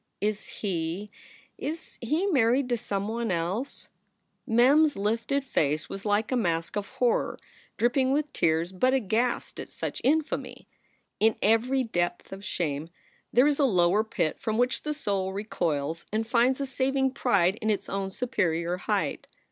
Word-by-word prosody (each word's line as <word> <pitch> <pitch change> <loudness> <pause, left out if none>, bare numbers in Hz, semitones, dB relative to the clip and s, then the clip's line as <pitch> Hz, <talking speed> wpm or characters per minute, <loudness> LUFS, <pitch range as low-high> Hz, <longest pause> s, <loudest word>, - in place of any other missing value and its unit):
"Is 210 0 -2
he 185 +1 -3 0.5
is 320 +3 -6
he 305 - 0
married 255 - +3
to 240 - +2
some 200 -3 -3
one 230 +1 -2
else?" 185 +10 -3 0.6
Mem 255 +7 +5
s 300 - -1
lifted 230 +7 0
face 155 - 0
was 195 +1 -7
like 210 +3 +1
a - - +2
mask 170 -7 0
of 205 -1 -2
horror, 250 -3 0 0.4
dripping 260 +2 +2
with 295 +1 0
tears 165 +2 +1
but 255 +8 +2
aghast 235 +1 0
at - - -6
such - - -5
infamy. 310 +3 0 0.5
In 220 0 +4
every 240 +5 +3
depth 175 -6 -2
of 195 +1 -9
shame 160 -6 -2 0.4
there 250 +4 +5
is 295 0 +2
a 285 - +5
lower 185 -2 +3
pit 165 -7 -2
from 220 0 -1
which 245 +1 +1
the 300 0 -3
soul 195 -8 -1
recoils 165 -6 -2
and 220 +1 0
finds 245 +3 +2
a 280 - -1
saving 265 0 0
pride 200 -7 +2
in 220 - 0
its 200 -2 0
own 195 -1 -2
superior 175 -6 -1
height. - - -1
220 Hz, 160 wpm, -27 LUFS, 185-260 Hz, 0.6 s, Mem